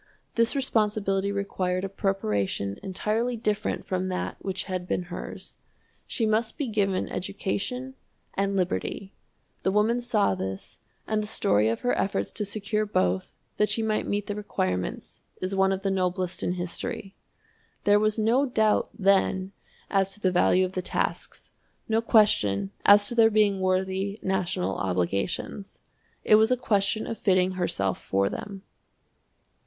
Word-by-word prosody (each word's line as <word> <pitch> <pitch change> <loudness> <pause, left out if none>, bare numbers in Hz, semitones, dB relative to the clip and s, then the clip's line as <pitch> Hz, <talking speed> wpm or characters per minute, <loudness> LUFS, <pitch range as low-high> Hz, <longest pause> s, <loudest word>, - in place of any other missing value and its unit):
This 230 +4 +2
responsibility 210 -6 +1
required 185 -2 -1
a - - -1
preparation 105 - -1
entirely 220 +5 -1
different 210 -2 -1
from 185 0 -1
that 185 -1 -3
which 190 -1 -3
had 185 -2 -4
been 180 - -1
hers. - - -8 0.5
She 230 - -1
must 220 +1 0
be 290 - -1
given 200 -4 0
education 225 +7 -3 0.4
and 195 0 0
liberty. 190 +1 -2 0.5
The 190 - +1
woman 220 +4 +2
saw 220 - +2
this, 95 +1 -6 0.3
and 215 -1 0
the 210 - -4
story 105 - +2
of 115 - -2
her 245 - +1
efforts 195 - -1
to 210 - -2
secure 210 +1 -1
both, 95 - 0 0.3
that 210 - +2
she 225 - +1
might 215 -1 0
meet 205 0 -1
the 205 - -3
requirements, 95 - -3 0.2
is 185 +1 -2
one 195 0 +3
of 195 0 -2
the 195 - +1
noblest 185 -1 -1
in 175 - 0
history. 180 +2 -4 0.7
There 205 0 +5
was 215 +1 +1
no 235 +6 +3
doubt, 220 -4 +2
then, 190 -1 +2 0.4
as 195 -1 +2
to - - -17
the 185 -3 +2
value 180 +1 +4
of 185 - -5
the 185 - -2
tasks, - - -3 0.4
no 225 0 +2
question 105 - +3 0.2
as 205 0 +8
to - - -3
their 225 -1 +6
being 210 -2 +3
worthy 190 +2 0
national 185 - -1
obligations. 100 - -2 0.4
It 215 - +6
was 220 +1 +4
a 255 - +3
question 215 -2 +1
of 225 - -5
fitting 185 -2 +3
herself 100 - -1
for 100 0 +1
them. 195 -1 -7
195 Hz, 155 wpm, -26 LUFS, 185-215 Hz, 0.7 s, as